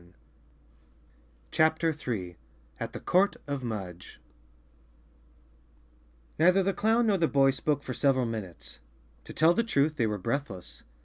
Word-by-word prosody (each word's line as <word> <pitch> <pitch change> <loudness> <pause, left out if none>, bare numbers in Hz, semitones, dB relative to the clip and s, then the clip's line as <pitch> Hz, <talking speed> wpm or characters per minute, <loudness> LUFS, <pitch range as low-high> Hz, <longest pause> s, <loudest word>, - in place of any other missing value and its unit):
35 90 +1 -25 1.3
CHAPTER 160 +1 +2
3 105 - -5 0.4
At - - -5
the - - -6
Court 195 +3 +2
of 140 -2 -3
Mudge 95 - -6 2.2
N 165 - +5
EITHER 190 +1 +4
the 195 +1 0
clown 225 +5 +2
nor 205 -4 +2
the 165 - +3
boy 135 -2 +4
spoke 145 +1 -1
for 130 - -5
several 130 -1 +2
minutes. 110 -7 -7 0.5
To - - -9
tell 165 +2 +4
the 230 - +1
truth, 155 -8 +1
they 115 - +1
were 105 -1 -2
breathless. 95 - -4
140 Hz, 140 wpm, -28 LUFS, 110-165 Hz, 2.2 s, N